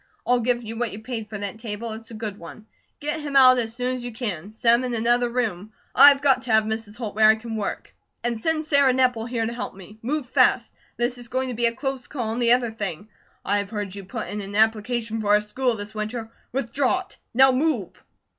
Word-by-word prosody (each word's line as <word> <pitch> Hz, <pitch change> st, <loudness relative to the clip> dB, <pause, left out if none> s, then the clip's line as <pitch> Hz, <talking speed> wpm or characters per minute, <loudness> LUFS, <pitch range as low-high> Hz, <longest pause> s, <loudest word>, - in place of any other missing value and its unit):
I'll 245 Hz, 0 st, +3 dB
give 240 Hz, 0 st, 0 dB
you 225 Hz, +1 st, -7 dB
what 240 Hz, -2 st, -1 dB
you 215 Hz, +2 st, -9 dB
paid 225 Hz, -3 st, -5 dB
for 215 Hz, -, -5 dB
that 205 Hz, +1 st, -4 dB
table. 225 Hz, 0 st, -4 dB
It's 220 Hz, +1 st, -8 dB
a 230 Hz, -, -9 dB
good 215 Hz, -2 st, -6 dB
one. 170 Hz, +6 st, -11 dB, 0.3 s
Get 300 Hz, +2 st, -2 dB
him 290 Hz, -2 st, -5 dB
out 255 Hz, -2 st, +8 dB
as 225 Hz, -1 st, -1 dB
soon 250 Hz, +1 st, -1 dB
as 250 Hz, -1 st, -5 dB
you 245 Hz, -, -5 dB
can. 210 Hz, -5 st, -4 dB
Set 230 Hz, +2 st, +3 dB
him 240 Hz, +2 st, +3 dB
in 250 Hz, -2 st, -2 dB
another 240 Hz, +2 st, +2 dB
room. 220 Hz, -4 st, -3 dB, 0.2 s
I've 285 Hz, 0 st, +7 dB
got 265 Hz, -3 st, +4 dB
to 250 Hz, -2 st, -4 dB
have 220 Hz, 0 st, +5 dB
Mrs. 220 Hz, 0 st, -4 dB
Holt 225 Hz, -4 st, -5 dB
where 215 Hz, 0 st, +5 dB
I 220 Hz, -, +6 dB
can 225 Hz, 0 st, -7 dB
work. 210 Hz, -2 st, -4 dB, 0.3 s
And 240 Hz, 0 st, 0 dB
send 310 Hz, +7 st, -1 dB
Sarah 280 Hz, -4 st, +4 dB
Nepple 250 Hz, -3 st, +1 dB
here 230 Hz, -2 st, -1 dB
to 230 Hz, -, -3 dB
help 240 Hz, -, -5 dB
me. 205 Hz, +3 st, -13 dB
Move 290 Hz, +4 st, -2 dB
fast! 255 Hz, -1 st, +2 dB, 0.2 s
This 245 Hz, +1 st, -1 dB
is 240 Hz, -, -5 dB
going 260 Hz, +2 st, -2 dB
to -, -, -3 dB
be 235 Hz, 0 st, +3 dB
a 230 Hz, -, -2 dB
close 270 Hz, -1 st, -4 dB
call. 235 Hz, -6 st, -3 dB
And 240 Hz, -, -3 dB
the 235 Hz, 0 st, +5 dB
other 245 Hz, -2 st, +1 dB
thing: 205 Hz, -2 st, -5 dB, 0.4 s
I've 200 Hz, 0 st, 0 dB
heard 205 Hz, -3 st, -4 dB
you 200 Hz, 0 st, -8 dB
put 220 Hz, +4 st, -6 dB
in 210 Hz, 0 st, -4 dB
an 200 Hz, 0 st, -7 dB
application 220 Hz, +1 st, +1 dB
for 210 Hz, -, -4 dB
our 210 Hz, 0 st, +5 dB
school 240 Hz, +3 st, -1 dB
this 205 Hz, 0 st, -7 dB
winter. 220 Hz, +1 st, -5 dB, 0.2 s
Withdraw 270 Hz, +6 st, 0 dB
it! -, -, -13 dB, 0.2 s
Now 265 Hz, +1 st, +7 dB
move!" 255 Hz, -, -1 dB
230 Hz, 240 wpm, -24 LUFS, 215-255 Hz, 0.4 s, out